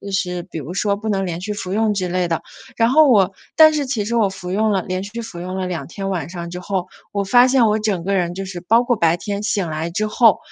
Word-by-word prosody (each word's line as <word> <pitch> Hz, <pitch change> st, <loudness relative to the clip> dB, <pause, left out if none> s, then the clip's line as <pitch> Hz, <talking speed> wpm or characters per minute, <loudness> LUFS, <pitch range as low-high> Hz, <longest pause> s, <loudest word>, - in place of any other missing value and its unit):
就 200 Hz, -, -8 dB
是 180 Hz, -2 st, -1 dB
比 170 Hz, -3 st, -8 dB
如 155 Hz, +4 st, -6 dB
说 200 Hz, 0 st, 0 dB
“不 220 Hz, +1 st, -5 dB
能 195 Hz, -1 st, 0 dB
连 170 Hz, 0 st, -4 dB
续 210 Hz, +1 st, -3 dB
服 190 Hz, -2 st, -5 dB
用” 220 Hz, -1 st, +2 dB
之 185 Hz, -2 st, -2 dB
类 180 Hz, 0 st, 0 dB
的。 165 Hz, -, -1 dB, 0.3 s
然 230 Hz, 0 st, +3 dB
后 300 Hz, +2 st, +6 dB
我 200 Hz, -6 st, +4 dB, 0.2 s
但 310 Hz, -1 st, +7 dB
是 290 Hz, -2 st, 0 dB
其 230 Hz, -6 st, -1 dB
实 235 Hz, -, -2 dB
我 210 Hz, -4 st, +3 dB
服 185 Hz, -2 st, -8 dB
用 215 Hz, +2 st, +2 dB
了 195 Hz, -2 st, +1 dB
连 185 Hz, 0 st, -3 dB
续 230 Hz, +3 st, -6 dB
服 175 Hz, -6 st, -8 dB
用 185 Hz, +1 st, -5 dB
了 185 Hz, -1 st, -2 dB
2 175 Hz, -2 st, -4 dB
天 195 Hz, +2 st, -5 dB
晚 175 Hz, -3 st, -3 dB
上 170 Hz, -1 st, -6 dB
之 180 Hz, -, -6 dB
后， 185 Hz, -1 st, -2 dB, 0.3 s
我 200 Hz, -1 st, 0 dB
发 245 Hz, +5 st, +6 dB
现 255 Hz, -3 st, +4 dB
我 215 Hz, +1 st, +2 dB
整 205 Hz, -5 st, -1 dB
个 200 Hz, 0 st, 0 dB
人 175 Hz, -2 st, 0 dB
就 195 Hz, +1 st, -5 dB
是 180 Hz, -2 st, -6 dB
包 230 Hz, +6 st, +4 dB
括 245 Hz, -1 st, +1 dB
白 170 Hz, -2 st, +2 dB
天 205 Hz, +1 st, -4 dB
醒 205 Hz, -5 st, -1 dB
来 160 Hz, +2 st, -3 dB
之 215 Hz, +5 st, -1 dB
后 220 Hz, -1 st, +4 dB
195 Hz, 295 characters per minute, -20 LUFS, 180-220 Hz, 0.3 s, 但